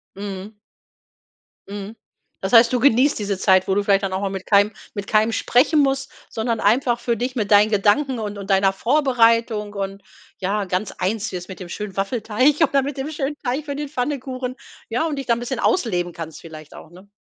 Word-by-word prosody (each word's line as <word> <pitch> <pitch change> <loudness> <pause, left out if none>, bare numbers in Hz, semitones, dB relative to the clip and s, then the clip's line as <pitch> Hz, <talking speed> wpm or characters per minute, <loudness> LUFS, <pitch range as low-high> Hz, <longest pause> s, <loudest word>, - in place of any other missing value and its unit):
Mhm. 200 +1 -7 1.1
Mhm. 200 +2 -7 0.5
Das 190 +3 -3
heißt, 230 0 +7
du 250 - +1
genießt 265 +1 +3
diese 200 -2 -2
Zeit, 190 -1 +3
wo 190 - +1
du 205 - +1
vielleicht 200 0 +2
dann 190 -1 -2
auch 190 - -2
mal 200 - -1
mit 190 -1 -6
keinem 205 0 +4 0.2
mit 205 0 -5
keinem 220 +1 +2
sprechen 280 +8 +3
muss, 270 0 0 0.2
sondern 225 0 -2
einfach 240 +3 +2
für 235 -1 -1
dich, 250 +3 -3
mit 215 -4 -2
deinen 205 +1 +6
Gedanken 220 +6 +2
und 210 -2 -5
und 200 0 -8
deiner 195 0 +4
Vorbereitung 230 -3 +2
und 195 0 -5 0.4
ja 200 +2 -1
ganz 185 +2 -2
eins 210 +3 -1
wirst 180 0 -6
mit 190 - -9
dem 185 - -7
schönen 200 +2 -7
Waffelteig 225 +6 +1
oder 280 -2 +3
mit 275 +1 -4
dem 270 +3 -4
schönen 295 -1 -3
Teig 270 +3 -2
für 285 -2 -4
den 295 0 -5
Pfannkuchen, 255 -2 -3 0.3
ja 240 +8 -1
und 305 -3 -3
dich 275 - -4
da 235 - +3
'n 230 - -2
bisschen 245 +1 -4
ausleben 180 - 0
kannst 160 -1 -8
vielleicht 155 -2 -12
auch, 160 - -13
ne? 185 +3 -16
215 Hz, 205 wpm, -21 LUFS, 195-255 Hz, 1.1 s, heißt